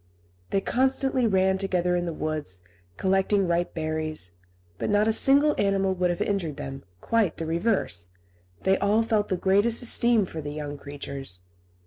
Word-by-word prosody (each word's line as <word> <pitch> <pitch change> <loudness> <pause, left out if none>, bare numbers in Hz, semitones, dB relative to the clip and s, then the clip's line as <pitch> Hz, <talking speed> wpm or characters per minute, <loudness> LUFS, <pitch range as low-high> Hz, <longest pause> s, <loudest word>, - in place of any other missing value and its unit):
They 195 - +1
constantly 260 +1 +1
ran 190 -1 +2
together 180 -2 +1
in 175 0 -1
the - - -2
woods, 155 - -3 0.4
collecting 195 +1 +2
ripe 175 +1 -1
berries; 155 - -2 0.5
but - - -2
not 205 +1 +3
a 225 - +3
single 285 +5 +5
animal 195 -1 +2
would 180 -1 0
have 175 - -2
injured 175 -8 -2
them; 135 0 -7 0.2
quite 225 -7 +1
the 165 - -4
reverse, 165 - 0 0.6
they 190 0 +3
all 210 +3 +2
felt 220 -2 0
the 185 - 0
greatest 205 +6 +2
esteem 235 -3 +4
for 160 -3 -7
the 145 0 -6
young 145 -1 -5
creatures. 140 -8 -5
190 Hz, 160 wpm, -26 LUFS, 155-210 Hz, 0.6 s, single